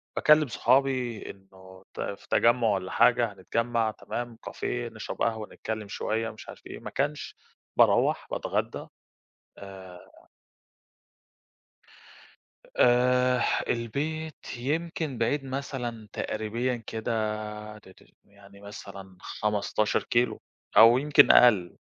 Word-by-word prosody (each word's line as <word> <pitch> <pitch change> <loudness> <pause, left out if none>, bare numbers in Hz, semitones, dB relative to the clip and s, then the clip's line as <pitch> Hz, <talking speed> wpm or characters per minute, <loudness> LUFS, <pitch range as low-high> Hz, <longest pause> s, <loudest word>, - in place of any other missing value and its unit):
باكلّم 150 0 +5
صحابي 125 -2 +1
إنه 95 -1 -17
ت - - -6
في 100 - -6
تجمُّع 120 0 +3
والَّا 95 -3 -1
حاجة 120 -2 +3
هنتجمّع، 115 +4 -1
تمام 120 +1 -6
cafe - - -13 0.3
نشرب 110 - -7
قهوة 110 -2 -1
نتكلم 110 -1 -5
شوية، 110 +3 -2
مش 110 - -12
عارف - - -12
إيه، - - -8
ما - - -7
كانش 145 +2 -3 0.4
باروّح - - +3
باتغدّى - - -3 0.7
آآ 95 -2 -13 2.5
آآ، 125 0 +4 0.3
البيت 150 +7 -3
يمكن 155 +1 -3
بعيد 135 +5 0
مثلًا 130 -5 -5
تقريبيًا 115 +4 -2
كده، 110 +1 -3 0.6
ت 105 - -17
ت 95 - -19 0.2
يعني 100 0 -18
مثلًا 100 -2 -10
15 105 0 -1
كيلو، 120 +1 0 0.4
أو 115 +2 +9
يمكن 145 +2 +6
أقل، 105 -8 +5
115 Hz, 105 wpm, -27 LUFS, 105-125 Hz, 2.5 s, أو